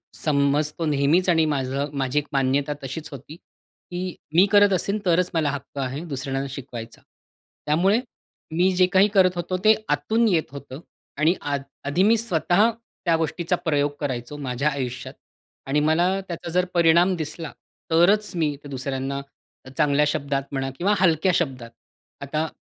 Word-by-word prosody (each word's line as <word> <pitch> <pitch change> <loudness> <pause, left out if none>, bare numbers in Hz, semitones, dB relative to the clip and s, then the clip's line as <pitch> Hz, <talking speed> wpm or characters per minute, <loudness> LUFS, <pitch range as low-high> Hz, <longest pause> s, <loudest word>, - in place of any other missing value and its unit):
समजतो 150 +2 +1
नेहमीच 150 +5 +2
आणि 165 -2 +4
माझं 135 +2 -2
माझी 130 +2 +1
एक 150 - -7
मान्यता 140 +2 +1
तशीच 135 +4 -6
होती. 145 +2 -10 0.6
की 180 0 -4 0.2
मी 180 +3 +7
करत 205 -1 +6
असेल, 200 +3 0
तरच 180 0 +2
मला 160 -3 +1
हक्क 140 0 -8
आहे 135 +3 -3
दुसऱ्यांना 135 -2 -3
शिकवायचा. 120 -4 -8 0.6
त्यामुळे 185 +9 +3 0.6
मी 180 +3 +3
जे 185 0 +5
काही 190 +2 +6
करत 185 -3 +5
होतो, 175 +1 -2
ते 215 0 +7
आतून 220 +11 +2
येत 170 -9 +1
होतं. 140 -1 -9 0.4
आणि 155 +4 +3
आध 145 -1 -2 0.3
आधी 170 +6 +2
मी 225 +3 +5
स्वतः 205 0 +2 0.4
त्या 170 -2 +3
गोष्टीचा 165 +2 -1
प्रयोग 145 -2 +1
करायचो 130 0 -4
माझ्या 135 +1 -1
आयुष्यात. 130 -3 -5 0.5
आणि 140 +2 +1
मला 170 +3 +3 0.2
त्याचा 170 -1 -6
जर 180 +1 +2
परिणाम 170 +2 +4
दिसला, 160 0 -5 0.4
तरच 200 +6 +4
मी 155 -4 0
ते 145 - -10
दुसऱ्यांना 135 0 -3 0.6
चांगल्या 150 0 +3
शब्दात 140 -2 -1
म्हणा 135 -1 -2
किंवा 200 +4 +2
हलक्या 175 0 +3
शब्दात. 130 -8 -2 0.5
आता 155 +3 -2
150 Hz, 150 wpm, -23 LUFS, 140-175 Hz, 0.6 s, मी